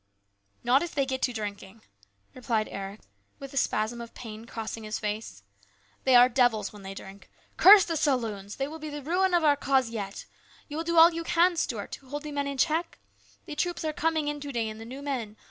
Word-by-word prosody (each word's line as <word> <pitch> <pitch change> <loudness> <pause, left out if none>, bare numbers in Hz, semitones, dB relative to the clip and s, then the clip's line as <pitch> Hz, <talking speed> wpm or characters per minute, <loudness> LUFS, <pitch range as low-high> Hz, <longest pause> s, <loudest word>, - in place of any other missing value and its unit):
" 100 0 -43
Not 250 +4 +4
if 345 - -5
they 275 -2 +2
get 260 0 -3
to 250 - +1
drinking," 210 -1 -7 0.5
replied 235 -4 -1
Eric 195 +2 -7 0.4
with 275 -1 -9
a - - -10
spasm 235 -1 0
of 235 - -10
pain 220 -2 -9
crossing 225 -1 -6
his 215 0 -3
face. 210 - -5 0.3
" 100 +1 -36
They 260 - +5
are 245 0 +9
devils 235 -5 +1
when 205 - -12
they 195 0 -8
drink. 195 +1 -11 0.3
Curse 395 0 +9
the 330 - -2
saloons! 225 -9 -1
They 270 - -2
will 320 +2 -8
be 310 0 -6
the 295 -1 -7
ruin 360 +4 +2
of 345 - +2
our 295 -2 +5
cause 265 -4 +1
yet. 200 -3 -5 0.4
You 295 - -7
will 325 - -1
do 335 0 -1
all 330 +1 +8
you 335 0 -3
can, 350 +1 +3
Stuart, 230 -10 -3
to 265 - -9
hold 290 +2 -5
the 300 - -6
men 285 -1 -2
in 280 -1 -4
check? 325 +4 0 0.5
The - - -7
troops 350 0 -2
are 310 - -1
coming 315 -1 0
in 295 0 -2
to 285 0 -6
day 230 -3 -1
and 215 +1 -9
the - - -8
new 265 +4 -8
men. 235 -7 -4
255 Hz, 230 wpm, -28 LUFS, 215-300 Hz, 0.5 s, are